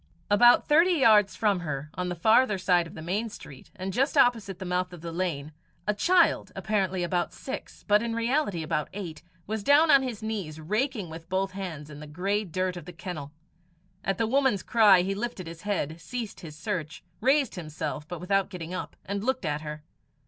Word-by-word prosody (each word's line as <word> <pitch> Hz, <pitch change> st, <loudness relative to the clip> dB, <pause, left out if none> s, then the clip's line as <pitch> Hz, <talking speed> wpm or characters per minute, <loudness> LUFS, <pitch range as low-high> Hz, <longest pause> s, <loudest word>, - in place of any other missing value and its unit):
About 240 Hz, +4 st, +6 dB
thirty 330 Hz, +5 st, +5 dB
yards 210 Hz, -, +5 dB
from 200 Hz, -1 st, +2 dB
her, 150 Hz, -3 st, -5 dB
on 180 Hz, 0 st, -3 dB
the 175 Hz, -, -3 dB
farther 220 Hz, +4 st, +4 dB
side 180 Hz, -2 st, +2 dB
of -, -, -13 dB
the 160 Hz, -, -8 dB
main 205 Hz, +7 st, -1 dB
street, 145 Hz, -, -12 dB
and 190 Hz, 0 st, -4 dB
just 270 Hz, +6 st, +1 dB
opposite 225 Hz, -8 st, +3 dB
the 190 Hz, -, -7 dB
mouth 180 Hz, 0 st, -1 dB
of 175 Hz, -, -10 dB
the 170 Hz, 0 st, -5 dB
lane, 165 Hz, -4 st, -3 dB, 0.3 s
a 210 Hz, -, +1 dB
child, 345 Hz, -, +3 dB
apparently 190 Hz, -4 st, 0 dB
about 175 Hz, 0 st, 0 dB
six, 265 Hz, -, -7 dB
but 210 Hz, 0 st, +5 dB
in 230 Hz, -1 st, -2 dB
reality 230 Hz, -, 0 dB
about 150 Hz, -1 st, -1 dB
eight, 175 Hz, -6 st, -6 dB, 0.2 s
was 220 Hz, +1 st, -3 dB
down 295 Hz, +8 st, +5 dB
on 275 Hz, -, +7 dB
his 245 Hz, -5 st, -5 dB
knees 195 Hz, -9 st, -4 dB
raking 210 Hz, -, -2 dB
with 165 Hz, +1 st, -10 dB
both 190 Hz, +1 st, 0 dB
hands 180 Hz, -6 st, -6 dB
in 150 Hz, -1 st, -10 dB
the 150 Hz, -, -9 dB
grey 195 Hz, +7 st, -1 dB
dirt 185 Hz, 0 st, -2 dB
of 175 Hz, -4 st, -8 dB
the 180 Hz, -, -9 dB
kennel. 165 Hz, -5 st, -6 dB, 0.7 s
At 195 Hz, -1 st, -1 dB
the 225 Hz, -, +1 dB
woman's 255 Hz, -5 st, +2 dB
cry 205 Hz, -6 st, +6 dB
he 195 Hz, +2 st, -1 dB
lifted 210 Hz, -2 st, -4 dB
his 165 Hz, 0 st, -9 dB
head, 170 Hz, -6 st, -2 dB
ceased 235 Hz, +3 st, -5 dB
his 160 Hz, -5 st, -9 dB
search, 165 Hz, -3 st, -4 dB, 0.2 s
raised 270 Hz, +1 st, +3 dB
himself, 155 Hz, -3 st, -5 dB
but 175 Hz, 0 st, -6 dB
without 195 Hz, +2 st, +1 dB
getting 180 Hz, -3 st, -7 dB
up, 185 Hz, -, -5 dB
and 200 Hz, +1 st, -3 dB
looked 260 Hz, -4 st, -1 dB
at 150 Hz, -1 st, -1 dB
her. 150 Hz, -1 st, -7 dB
190 Hz, 200 wpm, -27 LUFS, 165-220 Hz, 0.7 s, on